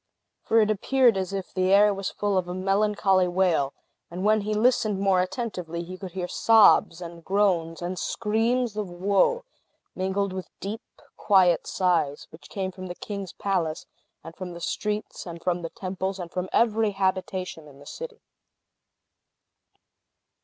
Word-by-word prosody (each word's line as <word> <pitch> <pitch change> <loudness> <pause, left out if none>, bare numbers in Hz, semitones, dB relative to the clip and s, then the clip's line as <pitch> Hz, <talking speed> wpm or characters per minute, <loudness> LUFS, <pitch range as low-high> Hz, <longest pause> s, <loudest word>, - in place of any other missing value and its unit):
For 225 - +3
it 215 0 +2
appeared 245 +2 +3
as 190 -1 -2
if 195 -2 -5
the 185 0 +1
air 205 +1 +6
was 195 -1 -3
full 205 -1 -1
of 185 -1 0
a 180 - -4
melancholy 195 -1 +2
wail; 175 -6 +1 0.4
and 180 +3 -5
when 215 0 +4
he 210 +1 -2
listened 215 -3 +2
more 195 -2 +3
attentively, 180 -5 -4
he 180 +2 -8
could 185 -2 -9
hear 180 -2 -3
sobs, 210 -5 +5
and 170 -1 -9
groans, 175 -4 +1
and 180 +1 -3
screams 230 +2 0
of 210 -3 -3
woe, 200 - +1 0.5
mingled 190 +1 -1
with 185 -1 -6
deep, 210 +3 -5 0.4
quiet 185 -4 +3
sighs, 165 -6 0
which 160 - -14
came 190 -2 -3
from 185 0 -8
the 175 - -6
king's 200 -4 -6
palace, 175 -6 -2 0.4
and 165 - -10
from 180 -2 -7
the 170 - -8
streets, 210 +3 -3
and 170 -1 -8
from 180 -1 0
the 165 - -5
temples, 190 +1 -4
and 175 -2 -7
from 185 0 -3
every 220 -2 +2
habitation 185 -4 -2
in 140 -2 -15
the 145 - -15
city. 465 - -8
190 Hz, 160 wpm, -26 LUFS, 180-210 Hz, 0.5 s, air